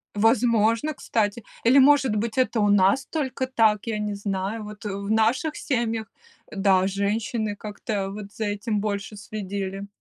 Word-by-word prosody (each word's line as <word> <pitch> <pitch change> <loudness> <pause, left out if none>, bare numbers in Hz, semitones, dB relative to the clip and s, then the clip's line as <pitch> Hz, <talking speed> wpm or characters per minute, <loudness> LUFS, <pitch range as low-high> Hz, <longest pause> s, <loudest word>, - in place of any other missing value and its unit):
Возможно, 225 +4 +3
кстати. 220 -4 -1 0.2
Или, 245 +4 +5
может 270 -4 +5
быть, 225 +3 -2
это 255 -3 +2
у 205 -1 +3
нас 205 +7 +4
только 270 -4 -2
так, 220 -5 +2
я 220 -2 -1
не 210 -1 -2
знаю. 200 +2 -3
Вот, 210 0 -10
э, - - -2
в 200 +1 -4
наших 235 +8 +2
семьях, 230 -4 -1 0.4
да, 190 -2 +3
женщины 210 +2 -1
как-то 205 -1 -4
вот 200 0 -8
за 220 - -3
этим 205 +1 -1
больше 205 0 -3
следили. 200 -1 -5
215 Hz, 155 wpm, -24 LUFS, 200-230 Hz, 0.4 s, Или